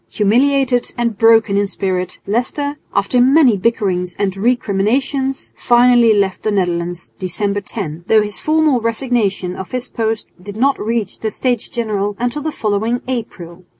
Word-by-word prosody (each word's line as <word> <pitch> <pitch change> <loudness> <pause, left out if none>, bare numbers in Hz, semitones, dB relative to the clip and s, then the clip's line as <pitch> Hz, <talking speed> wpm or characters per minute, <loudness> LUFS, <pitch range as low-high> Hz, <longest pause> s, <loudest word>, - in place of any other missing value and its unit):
Humiliated 245 - +2
and 235 -2 -1
broken 225 -1 +4
in 205 0 +1
spirit, 185 -2 -3
Leicester, 285 +7 -2
after 200 +5 +1
many 265 -2 +5
bickerings 185 -4 -1
and 195 -2 -1
recriminations, 245 +5 -1
finally 240 -1 +4
left 200 -3 +1
the - - -1
Netherlands 175 -3 -2
(December 200 +2 -1
10), 170 -5 -6
though 220 -1 +4
his 205 -2 -4
formal 310 -5 +2
resignation 220 -6 -1
of 190 - -7
his 250 0 -4
post 225 -1 -3
did 205 +2 -9
not 275 +4 +2
reach 225 -2 -2
the 220 - -2
States 245 +1 -2
General 205 -4 -2
until 245 +5 -2
the 315 +1 -3
following 220 +1 -1
April. 185 -8 -6
220 Hz, 150 wpm, -17 LUFS, 195-245 Hz, -, many